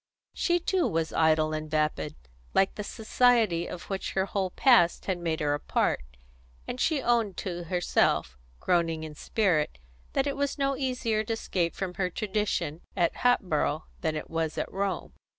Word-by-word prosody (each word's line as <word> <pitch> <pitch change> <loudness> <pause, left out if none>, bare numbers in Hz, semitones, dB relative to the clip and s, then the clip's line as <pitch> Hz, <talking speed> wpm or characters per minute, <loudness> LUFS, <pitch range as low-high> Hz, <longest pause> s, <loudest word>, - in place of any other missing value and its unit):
She 350 -1 +1
too 360 +1 +1
was 160 -1 -1
idle 155 -1 +3
and 155 0 -4
vapid, 150 - 0 0.4
like 195 - +4
the 210 - -5
society 220 -5 +2
of 180 - -7
which 195 -1 -4
her 190 0 +1
whole 195 -1 -1
past 205 -5 +4
had 185 -2 -1
made 165 -2 -1
her 145 -1 +2
a 145 - -1
part, - - 0 0.7
and 250 - -4
she 300 -5 +1
owned 230 -6 +1
to 175 -2 -4
herself, 175 - +1 0.2
groaning 165 -3 +1
in 155 -1 -6
spirit, 165 - 0 0.4
that 270 - +2
it 280 - -1
was 280 +1 -1
no 275 -1 +1
easier 250 -5 0
to 225 - -1
escape 180 -6 -1
from 190 -2 -3
her 180 - +1
tradition 190 -5 -2 0.2
at 170 -2 +2
Hatboro' 160 -10 +1 0.2
than 160 -2 -1
it 155 - -4
was 165 -1 -2
at - - -2
Rome. 195 -2 -2
185 Hz, 170 wpm, -28 LUFS, 160-225 Hz, 0.7 s, like